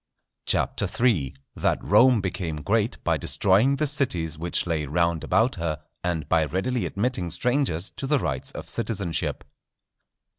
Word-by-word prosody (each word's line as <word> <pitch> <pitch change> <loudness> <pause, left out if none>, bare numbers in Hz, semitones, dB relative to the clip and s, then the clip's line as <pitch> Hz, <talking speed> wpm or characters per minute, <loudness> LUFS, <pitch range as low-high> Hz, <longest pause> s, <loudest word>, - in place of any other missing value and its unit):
CHAPTER - - +1 0.2
III.—_That 70 - 0
Rome 125 -4 +5
became 85 -5 -3
great - - +1
by - - +2
destroying 105 +8 +3
the 150 - 0
Cities 105 - 0
which 85 +3 -1
lay 80 -4 -1
round 85 +2 +1
about 110 +5 +2
her, 80 -3 -2 0.2
and 85 -3 -2
by 80 -2 +3
readily 105 - -1
admitting 100 -4 -1
strangers 115 - 0
to 135 - -4
the 150 - +3
rights 75 - -2
of - - -7
Citizenship. 100 -7 -2
90 Hz, 140 wpm, -25 LUFS, 80-125 Hz, 0.2 s, Rome